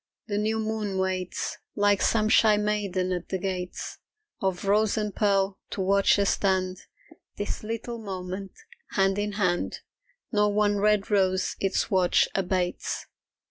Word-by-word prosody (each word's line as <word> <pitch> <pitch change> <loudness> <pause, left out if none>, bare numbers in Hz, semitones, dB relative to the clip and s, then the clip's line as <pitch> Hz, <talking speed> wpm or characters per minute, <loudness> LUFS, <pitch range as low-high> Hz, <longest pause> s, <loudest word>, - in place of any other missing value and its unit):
The 205 -2 -1
new 220 +1 0
moon 215 -3 -2
waits 185 -1 -2 0.2
Like 205 -1 +3
some 215 -2 +3
shy 215 -1 +5
maiden 205 -3 0
at 180 -1 -3
the 190 - -1
gates 180 -1 -4 0.4
Of 190 -1 -1
rose 210 +2 +3
and 210 -2 -2
pearl, 195 -2 +1
to 195 - -3
watch 195 +2 +4
us 200 -1 +3
stand 185 -1 0 0.6
This 205 - -3
little 230 +2 -5
moment, 190 -1 -6 0.4
hand 195 0 +2
in 205 0 -2
hand 185 -4 0 0.5
Nor 210 -1 +2
one 205 -1 +3
red 210 0 +2
rose 190 -2 +2
its 195 -1 0
watch 185 -2 +4
abates. 185 -2 -1
200 Hz, 140 wpm, -27 LUFS, 185-210 Hz, 0.6 s, shy